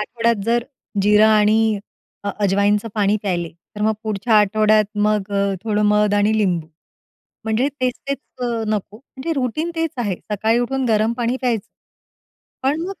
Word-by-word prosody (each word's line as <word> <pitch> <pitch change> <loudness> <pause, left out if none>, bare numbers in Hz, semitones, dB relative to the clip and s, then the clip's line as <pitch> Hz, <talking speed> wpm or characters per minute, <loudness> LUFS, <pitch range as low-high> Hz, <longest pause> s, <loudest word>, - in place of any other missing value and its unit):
आठवड्यात 230 -1 0
जर 235 +1 +1 0.4
जिरा 210 +2 +5
आणि 215 0 +3 0.5
अ, 200 - 0
अजवाईंचं 205 +2 +2
पाणी 205 -1 +2
प्यायले, 175 -4 -1 0.3
तर - - -6
मग 220 +1 +3
पुढच्या 215 +1 0
आठवड्यात 215 +1 +4 0.2
मग 210 -1 0
अ, 200 0 +1
थोडं 210 -1 +1
मध 210 0 +3
आणि 205 +1 +2
लिंबू. 180 -6 0 0.8
म्हणजे 220 +5 +1
तेच-तेच 255 +2 -2 0.2
अ, - - 0 0.2
नको. 210 -1 -2
म्हणजे 265 +6 -6
रुटीन 305 +7 -2
तेच 325 -1 0
आहे 205 -6 -1 0.2
सकाळी 220 +3 +2
उठून 265 +2 -1
गरम 220 +1 +2
पाणी 240 +1 0
प्यायचं. 235 -6 0 1.0
पण 300 +6 0
215 Hz, 150 wpm, -20 LUFS, 205-235 Hz, 1.0 s, जिरा